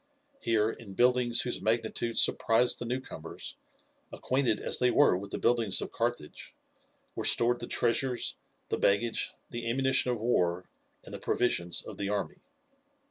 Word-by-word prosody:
Here, 110 Hz, -1 st, +1 dB
in 100 Hz, -4 st, -11 dB
buildings 125 Hz, 0 st, +3 dB
whose 125 Hz, -, -1 dB
magnitude 115 Hz, +1 st, -1 dB
surprised 120 Hz, +2 st, +3 dB
the 120 Hz, -, -5 dB
newcomers, 125 Hz, +2 st, -6 dB, 0.5 s
acquainted 130 Hz, -4 st, 0 dB
as -, -, +2 dB
they 125 Hz, -, +3 dB
were 145 Hz, -4 st, +4 dB
with 100 Hz, +2 st, -6 dB
the -, -, -4 dB
buildings 115 Hz, -5 st, +3 dB
of -, -, -5 dB
Carthage, 115 Hz, -10 st, -4 dB, 0.6 s
were -, -, -5 dB
stored 120 Hz, +1 st, +3 dB
the 120 Hz, -, -6 dB
treasures, 125 Hz, +1 st, +1 dB, 0.3 s
the -, -, -2 dB
baggage, 110 Hz, +3 st, +1 dB, 0.2 s
the 120 Hz, -1 st, -4 dB
ammunition 130 Hz, +1 st, +1 dB
of 120 Hz, -2 st, -1 dB
war, 90 Hz, -6 st, 0 dB, 0.4 s
and -, -, -10 dB
the -, -, -6 dB
provisions 90 Hz, -8 st, 0 dB
of -, -, -10 dB
the 100 Hz, -1 st, -3 dB
army. 105 Hz, -, -3 dB
120 Hz, 150 wpm, -29 LUFS, 110-125 Hz, 0.6 s, were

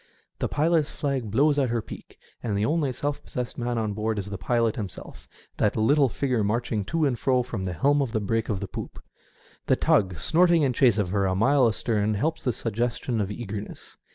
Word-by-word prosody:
The -, -, 0 dB
pilots 155 Hz, 0 st, +2 dB
flag 135 Hz, -6 st, -2 dB
blows 145 Hz, +7 st, +3 dB
at 130 Hz, -3 st, +1 dB
her 115 Hz, 0 st, 0 dB
peak; -, -, -10 dB, 0.2 s
and 105 Hz, -4 st, -2 dB
the 105 Hz, -, +1 dB
only 150 Hz, -2 st, +1 dB
self 145 Hz, +3 st, -3 dB
pos -, -, -18 dB
sessed 125 Hz, 0 st, -3 dB
man 120 Hz, 0 st, -1 dB
on 110 Hz, -2 st, -1 dB
board 110 Hz, +1 st, -2 dB
is 100 Hz, 0 st, -4 dB
the 100 Hz, -, -4 dB
pilot 115 Hz, -1 st, +1 dB
himself 100 Hz, -6 st, -8 dB
— -, -, -31 dB
that 105 Hz, -, +2 dB
little 135 Hz, +5 st, +3 dB
figure 125 Hz, -2 st, 0 dB
marching 110 Hz, 0 st, -1 dB
to 160 Hz, +6 st, 0 dB
and 125 Hz, -4 st, 0 dB
fro 130 Hz, -2 st, +2 dB
from 115 Hz, -6 st, -5 dB
the 90 Hz, -, -3 dB
helm 140 Hz, -, +2 dB
to 125 Hz, -, -4 dB
the 110 Hz, -, 0 dB
break 115 Hz, +2 st, -1 dB
of 100 Hz, -3 st, -1 dB
the 100 Hz, -, -3 dB
poop. -, -, -7 dB, 0.7 s
The -, -, +4 dB
tug 95 Hz, -4 st, +2 dB
snorting 170 Hz, -, +3 dB
in 130 Hz, -3 st, +2 dB
chase 120 Hz, -4 st, +4 dB
of 100 Hz, -4 st, 0 dB
her 100 Hz, -1 st, +1 dB
a 95 Hz, -, 0 dB
mile 130 Hz, +5 st, +4 dB
astern 110 Hz, -2 st, 0 dB
helps 160 Hz, +10 st, -1 dB
the 125 Hz, -, 0 dB
suggestion 115 Hz, +1 st, -2 dB
of 100 Hz, -, -2 dB
eagerness. 105 Hz, -1 st, -7 dB
115 Hz, 220 wpm, -26 LUFS, 105-140 Hz, 0.7 s, The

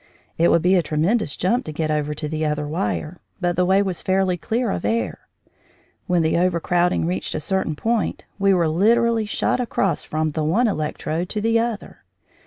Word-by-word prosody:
It 170 Hz, -, +3 dB
would 170 Hz, -, +3 dB
be 180 Hz, +2 st, +4 dB
a 185 Hz, -, +4 dB
tremendous 160 Hz, +5 st, 0 dB
jump 235 Hz, +8 st, +1 dB
to 155 Hz, -, -5 dB
get 155 Hz, 0 st, -2 dB
over 150 Hz, 0 st, -1 dB
to 150 Hz, 0 st, -4 dB
the 155 Hz, +1 st, -3 dB
other 150 Hz, -1 st, -1 dB
wire, 150 Hz, -, -3 dB, 0.2 s
but 175 Hz, -2 st, 0 dB
the 180 Hz, -, +2 dB
way 195 Hz, +2 st, +4 dB
was 185 Hz, -3 st, -3 dB
fairly 190 Hz, -1 st, +1 dB
clear 225 Hz, +5 st, -1 dB
of -, -, -3 dB
air. 230 Hz, +1 st, -2 dB, 0.8 s
When 180 Hz, -2 st, +2 dB
the 160 Hz, +1 st, +2 dB
overcrowding 175 Hz, -1 st, +1 dB
reached 180 Hz, +2 st, -3 dB
a -, -, -1 dB
certain 175 Hz, 0 st, -1 dB
point 225 Hz, +6 st, -1 dB
we 195 Hz, 0 st, +4 dB
were 175 Hz, -3 st, +3 dB
literally 225 Hz, +6 st, +2 dB
shot 210 Hz, -, 0 dB
across 225 Hz, -6 st, 0 dB
from 155 Hz, 0 st, -1 dB
the 155 Hz, +1 st, -2 dB
one 200 Hz, +11 st, +2 dB
electrode 160 Hz, -1 st, -2 dB
to 210 Hz, -, -2 dB
the 230 Hz, +1 st, +2 dB
other. 230 Hz, -2 st, -4 dB
180 Hz, 195 wpm, -22 LUFS, 155-205 Hz, 0.8 s, be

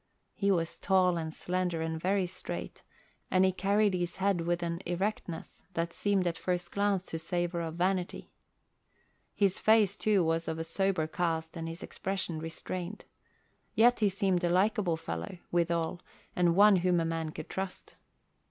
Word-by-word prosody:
He 200 Hz, -, 0 dB
was 170 Hz, -4 st, 0 dB
tall 185 Hz, -2 st, +3 dB
and 160 Hz, -1 st, -3 dB
slender 180 Hz, -1 st, -1 dB
and 160 Hz, 0 st, -3 dB
very 190 Hz, +1 st, +2 dB
straight, 180 Hz, -, -6 dB, 0.5 s
and 185 Hz, 0 st, +4 dB
he 190 Hz, -, +4 dB
carried 200 Hz, +2 st, +2 dB
his 175 Hz, -1 st, -2 dB
head 190 Hz, -2 st, +1 dB
with 175 Hz, +1 st, 0 dB
an 170 Hz, +1 st, -2 dB
erectness 175 Hz, -1 st, -3 dB
that 170 Hz, 0 st, -1 dB
seemed 200 Hz, -3 st, +1 dB
at 165 Hz, -1 st, -1 dB
first 180 Hz, -1 st, -2 dB
glance 200 Hz, -2 st, +1 dB
to 165 Hz, -, -5 dB
savour 175 Hz, +1 st, -1 dB
of 165 Hz, -1 st, -4 dB
vanity. 180 Hz, +1 st, -1 dB, 1.0 s
His 195 Hz, -2 st, +2 dB
face, 215 Hz, -3 st, +4 dB
too, 210 Hz, -3 st, +2 dB
was 165 Hz, 0 st, 0 dB
of 160 Hz, 0 st, -2 dB
a 165 Hz, -, -2 dB
sober 180 Hz, 0 st, 0 dB
cast 160 Hz, -1 st, -2 dB
and 165 Hz, -1 st, -4 dB
his 165 Hz, +4 st, -7 dB
expression 190 Hz, -4 st, -3 dB
restrained. 175 Hz, +4 st, -6 dB, 0.7 s
Yet 240 Hz, +2 st, +5 dB
he 210 Hz, -2 st, +4 dB
seemed 190 Hz, -2 st, +1 dB
a 175 Hz, -, +2 dB
likable 190 Hz, -1 st, +2 dB
fellow, 85 Hz, -, -5 dB
withal, 170 Hz, 0 st, 0 dB, 0.3 s
and 175 Hz, -1 st, +3 dB
one 205 Hz, 0 st, +7 dB
whom 180 Hz, -1 st, +2 dB
a 165 Hz, -, 0 dB
man 165 Hz, -1 st, -2 dB
could 155 Hz, -, -7 dB
trust. 190 Hz, -1 st, -5 dB
175 Hz, 165 wpm, -31 LUFS, 165-195 Hz, 1.0 s, one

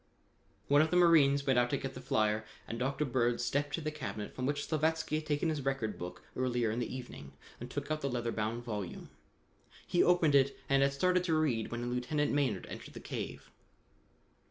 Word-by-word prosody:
One 145 Hz, +1 st, +6 dB
of 160 Hz, -, +2 dB
the 180 Hz, -, +2 dB
marines 145 Hz, -5 st, +5 dB
went 130 Hz, -2 st, +4 dB
out 120 Hz, 0 st, +2 dB
to -, -, +1 dB
get -, -, -5 dB
the -, -, -8 dB
flyer, 110 Hz, 0 st, +1 dB, 0.2 s
and 115 Hz, -, -4 dB
Dr. 135 Hz, +4 st, 0 dB
Bird 120 Hz, -2 st, +1 dB
stepped 145 Hz, +3 st, 0 dB
to 165 Hz, -, -5 dB
the 155 Hz, 0 st, -2 dB
cabinet 110 Hz, -8 st, -5 dB
from 130 Hz, 0 st, -2 dB
which 145 Hz, 0 st, -1 dB
Slavatsky 160 Hz, 0 st, 0 dB
had 155 Hz, 0 st, -5 dB
taken 150 Hz, +2 st, +1 dB
his 150 Hz, -3 st, -2 dB
record 135 Hz, -6 st, -2 dB
book 90 Hz, +1 st, -7 dB
earlier 120 Hz, -3 st, 0 dB
in 115 Hz, -, -2 dB
the 120 Hz, -, -3 dB
evening 120 Hz, -, -8 dB, 0.3 s
and -, -, -7 dB
took -, -, -4 dB
out 155 Hz, 0 st, -1 dB
the 140 Hz, -, -1 dB
leather 120 Hz, -2 st, -2 dB
bound 110 Hz, +2 st, -2 dB
volume. 105 Hz, -6 st, -5 dB, 0.7 s
He 175 Hz, -, +2 dB
opened 175 Hz, -4 st, +4 dB
it 140 Hz, -1 st, +4 dB
and 135 Hz, 0 st, +3 dB
had 140 Hz, 0 st, +3 dB
started 180 Hz, +5 st, +2 dB
to 165 Hz, -3 st, +2 dB
read 125 Hz, -8 st, +1 dB
when 120 Hz, +1 st, -3 dB
Lieutenant 145 Hz, +4 st, 0 dB
Maynard 130 Hz, -10 st, 0 dB
entered -, -, -9 dB
the -, -, -6 dB
cave. -, -, -6 dB
135 Hz, 205 wpm, -32 LUFS, 120-150 Hz, 0.7 s, One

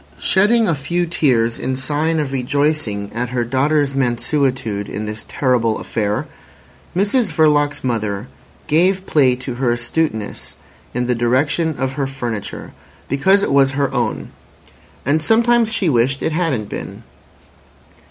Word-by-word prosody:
Shedding 215 Hz, +4 st, +3 dB
a 170 Hz, -, +2 dB
few 170 Hz, +5 st, -1 dB
tears 120 Hz, -9 st, +1 dB
in 130 Hz, -, -2 dB
sign 150 Hz, +4 st, 0 dB
of 145 Hz, -3 st, -2 dB
rejoicing 130 Hz, -6 st, -1 dB
at 120 Hz, +1 st, -2 dB
her 125 Hz, -1 st, -1 dB
daughter's 140 Hz, +3 st, +1 dB
mansuetude 125 Hz, -4 st, -1 dB
in 105 Hz, +2 st, -4 dB
this 105 Hz, 0 st, -6 dB
terrible 120 Hz, -5 st, +1 dB
affair, 105 Hz, -2 st, -2 dB, 0.7 s
Mrs 205 Hz, +5 st, +2 dB
Verloc's 145 Hz, -2 st, +2 dB
mother 110 Hz, -3 st, -2 dB, 0.4 s
gave 185 Hz, +5 st, +2 dB
play 135 Hz, -7 st, +3 dB
to 130 Hz, 0 st, -6 dB
her 125 Hz, -, +2 dB
astuteness 120 Hz, -2 st, -3 dB, 0.4 s
in 125 Hz, 0 st, 0 dB
the 125 Hz, -, +1 dB
direction 135 Hz, +7 st, +1 dB
of 135 Hz, 0 st, -2 dB
her 135 Hz, -1 st, -2 dB
furniture, 120 Hz, -6 st, -5 dB, 0.4 s
because 190 Hz, +9 st, +3 dB
it -, -, 0 dB
was 135 Hz, -1 st, +4 dB
her 140 Hz, -1 st, 0 dB
own; -, -, -2 dB, 0.7 s
and 150 Hz, +4 st, +2 dB
sometimes 230 Hz, +4 st, +3 dB
she 205 Hz, -5 st, 0 dB
wished 135 Hz, -1 st, +1 dB
it -, -, 0 dB
hadn't 150 Hz, -, -1 dB
been. -, -, -7 dB
135 Hz, 140 wpm, -19 LUFS, 120-160 Hz, 0.7 s, was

